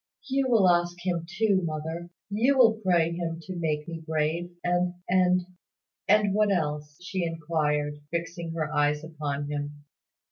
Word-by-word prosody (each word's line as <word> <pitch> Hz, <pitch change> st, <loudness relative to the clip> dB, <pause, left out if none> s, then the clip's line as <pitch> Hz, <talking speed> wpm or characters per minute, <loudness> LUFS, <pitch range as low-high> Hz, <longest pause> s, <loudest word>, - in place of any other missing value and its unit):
"You 270 Hz, 0 st, +1 dB
will 220 Hz, -6 st, +5 dB
ask 175 Hz, 0 st, +2 dB
Him 170 Hz, -2 st, -1 dB
too, 195 Hz, 0 st, +2 dB
mother; 160 Hz, +2 st, -4 dB, 0.2 s
you 245 Hz, +7 st, +3 dB
will 230 Hz, -4 st, +7 dB
pray 170 Hz, -3 st, +3 dB
Him 170 Hz, -1 st, -3 dB
to 185 Hz, +1 st, -6 dB
make 155 Hz, -3 st, -1 dB
me 165 Hz, -1 st, -5 dB
brave, 160 Hz, +2 st, -1 dB
and 175 Hz, 0 st, +1 dB
and 180 Hz, 0 st, +3 dB, 0.3 s
" -, -, -65 dB
"And 205 Hz, -1 st, +5 dB
what 210 Hz, 0 st, +3 dB
else?" 150 Hz, -4 st, -1 dB
she 185 Hz, -1 st, -2 dB
inquired, 150 Hz, -3 st, -1 dB
fixing 170 Hz, 0 st, -4 dB
her 155 Hz, -2 st, -2 dB
eyes 150 Hz, 0 st, +2 dB
upon 145 Hz, -3 st, -4 dB
him. 145 Hz, 0 st, -5 dB
170 Hz, 155 wpm, -27 LUFS, 150-185 Hz, 0.3 s, will